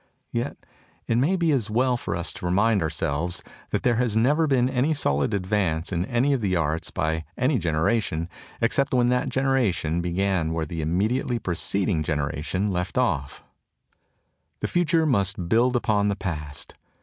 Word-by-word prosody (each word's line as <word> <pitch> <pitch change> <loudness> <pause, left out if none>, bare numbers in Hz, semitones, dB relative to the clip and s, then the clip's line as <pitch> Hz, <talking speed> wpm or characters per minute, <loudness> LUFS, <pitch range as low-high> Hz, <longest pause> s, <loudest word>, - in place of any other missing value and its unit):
Yet 120 +4 -2 0.5
it 115 - +1
may 155 +9 +2
be 170 -3 +2
as 120 -7 0
well 125 +3 +2
for 120 - -3
us 85 -1 -3
to - - -8
remind 100 +3 +3
ourselves 80 +1 -1 0.3
that - - -1
there 120 -2 +2
has 120 -3 +1
never 145 +8 +3
been 130 -3 +3
any 135 +4 +1
solid 70 - +1
advance 95 -4 0
in 85 +1 0
any 125 +5 +1
of 130 - 0
the 95 -3 +1
arts 80 -1 -1
by 80 0 -1
any 130 0 +2
generation 80 +1 0 0.3
except 130 +4 +1
when 120 -1 +3
that 125 0 +1
generation 120 - +1
began 90 -2 0
where 80 -1 -1
the 80 +2 -4
immediately 110 - 0
preceding 90 -2 0
genera 75 -1 -2
tion 95 +6 -1
left 90 +4 -2
off. 75 - 0 1.2
The - - 0
future 170 -2 +2
must 100 - 0
build 120 +6 +3
upon 105 -4 +2
the 100 - +1
past. 75 -6 -5
100 Hz, 165 wpm, -25 LUFS, 85-125 Hz, 1.2 s, remind